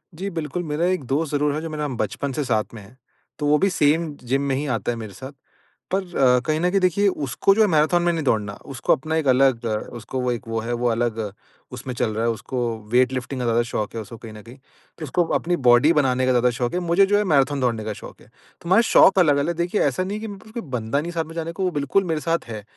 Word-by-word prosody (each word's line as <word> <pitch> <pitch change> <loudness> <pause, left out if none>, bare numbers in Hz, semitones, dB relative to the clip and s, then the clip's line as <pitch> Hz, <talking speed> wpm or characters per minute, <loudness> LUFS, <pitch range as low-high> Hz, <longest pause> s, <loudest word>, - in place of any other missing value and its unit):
जी, 195 +4 -4
बिल्कुल। 165 0 -4
मेरा 155 +1 -1
एक 180 - -3
दोस्त 150 +4 -1
ज़रूर 145 0 +1
है 155 - -3
जो 165 - -5
मेरा 150 -1 -3
बचपन 140 -1 -3
से 150 - -1
साथ 110 -3 -1
में 110 - -9
है 110 +6 -17 0.4
तो 150 - -2
वो 150 +1 +4
भी 195 +5 +2
सेम 160 -1 +1 0.2
जिम 135 - +2
में 130 - +1
ही 145 - -2
आता 110 - -3
है - - -3
मेरे 110 -3 -8
साथ। 130 +8 -9 0.6
पर 195 - +2 0.4
कहीं 155 0 0
न 175 +2 +2
कहीं 195 - +3
देखिए 185 +3 +2
उसको 145 +1 +1
जो 220 - +3
है 210 - +5
मैराथन 160 +1 +3
में 175 - +3
नहीं 160 -2 -2
दौड़ना, 105 -5 0
उसको 130 -5 0
अपना 155 +4 -2
एक 155 - -1
अलग 130 -2 +3 0.3
उसको 120 +3 -5
वो 125 -1 0
एक 120 0 -5
वो 115 0 -2
है। 120 +2 -3
वो 120 +1 0
अलग 115 -1 -1 0.5
उसमें 125 0 -6
चल 110 - 0
रहा 115 - -1
है 115 - +2
उसको 125 +4 -5 0.3
वेट 125 +1 +4
लिफ्टिंग 130 +1 -4
का - - -1
ज़्यादा 115 0 +2
शौक 105 +2 -3
है 115 - -3
उसको 110 +2 -10
कहीं 110 -1 -10
न 105 - -10
कहीं। 120 +3 -13 0.4
तो 155 - -4
उसको 175 +6 +1 0.2
अपनी 175 +1 -1
बॉडी 125 +7 +6
बनाने 130 -4 +2
का 130 - +2
ज़्यादा 125 0 +3
शौक 120 +2 -2
है, 180 - 0
मुझे 175 +3 +3
जो 205 +1 +2
है 210 - +2
मैराथन 145 -5 +2
दौड़ने 120 -4 0
का 110 - -3
शौक - - -12
है। - - -18
तो 170 - -15
हमारे 200 +6 +5
शौक 195 -3 +5
अलग-अलग 150 0 +2
देखिए 175 +4 0
ऐसा 185 - +1
नहीं 200 +3 -4
है - - -8
कि 225 - -5
मेरे 200 -2 -8
पास 220 - -16
कोई 235 -1 -5 0.2
बंदा 115 +6 -1
नहीं 170 +3 -5
साथ 165 -2 -1
में 160 - -11
जाने 165 0 -3
को 180 +3 -4
वो 185 - +1
बिल्कुल 145 +5 +1
मेरे 155 - -2
साथ 165 +1 -1
है। 110 -3 -7
145 Hz, 270 wpm, -22 LUFS, 120-170 Hz, 0.6 s, बॉडी